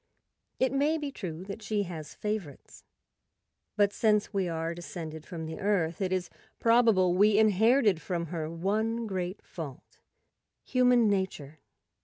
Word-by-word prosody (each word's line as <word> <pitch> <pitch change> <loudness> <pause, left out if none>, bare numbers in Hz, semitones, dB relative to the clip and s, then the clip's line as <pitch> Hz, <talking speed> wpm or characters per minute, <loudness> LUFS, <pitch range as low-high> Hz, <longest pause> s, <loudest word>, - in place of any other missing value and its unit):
It 260 - +2
may 290 +4 +2
be 295 -2 -4
true 180 - -6
that 200 +3 -7
she 210 -1 -1
has 165 -5 -8
favorites; 210 -10 -5 0.9
but 205 -1 +3
since 210 -1 +2
we 190 -3 0
are 165 0 -2
descended 160 -2 -7
from 165 -2 -6
the 160 +4 -6
Earth, 195 -5 0
it 185 -1 0
is 185 -1 -1 0.3
probable 225 -6 +4
we 205 +3 +4
inherited 220 -2 +4
from 170 0 -2
her 160 -2 -3
one 215 +7 -1
great 185 -2 -4
fault—human 240 - -2
nature. 185 -7 -2
195 Hz, 135 wpm, -29 LUFS, 170-220 Hz, 0.9 s, probable